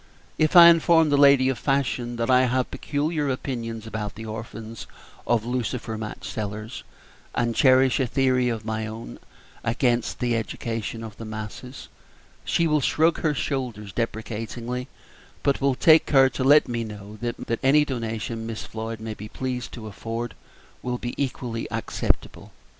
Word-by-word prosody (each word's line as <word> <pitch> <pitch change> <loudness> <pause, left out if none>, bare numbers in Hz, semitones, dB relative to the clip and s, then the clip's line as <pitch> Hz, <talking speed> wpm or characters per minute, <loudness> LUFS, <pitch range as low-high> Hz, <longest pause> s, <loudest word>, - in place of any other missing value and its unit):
If 155 +2 +2
I 170 -1 +11
inform 165 -2 +4
the - - +4
lady 140 -2 +6
of 130 -5 -2
fashion 130 -3 0
that 115 0 -1
I 130 0 +5
have 125 +1 0
peculiar 150 0 -1
opinions 115 -4 -4
about 105 -2 -5
the 110 - -8
orphans 110 0 -7 0.4
of 115 -2 +2
lucifer 120 -2 -2
match 110 0 -6
sellers, 110 +2 -5 0.5
and 120 -1 0
cherish 130 -1 +5
a 130 - +1
theory 130 -1 +2
of 110 -2 -4
my 110 0 -2
own 110 - -8 0.4
against 120 0 0
the 120 -1 0
education 115 0 -4
of 110 -2 -9
the 115 - -7
masses, 110 +4 -7 0.6
she 170 - +1
will 150 -2 +2
shrug 160 +5 +2
her 155 -2 +1
shoulders 120 -8 -3
deprecatingly, 115 +2 -4 0.6
but 140 0 +1
will 135 -1 +2
take 160 +4 +6
care 135 -2 +5
to 130 - -3
let 145 +3 +6
me 120 -1 -2
know 105 -1 -9
that 120 -1 -3
any 150 +3 +5
donation 115 -3 -4
Miss 115 -1 -5
Floyd 110 0 -6
may 110 0 -5
be 105 0 -9
pleased 125 -2 -4
to 115 -3 -8
afford 115 +2 -5 0.5
will 125 0 -2
be 120 0 -5
equally 120 -3 -4
acceptable. 115 -1 -2
120 Hz, 160 wpm, -25 LUFS, 110-135 Hz, 0.6 s, I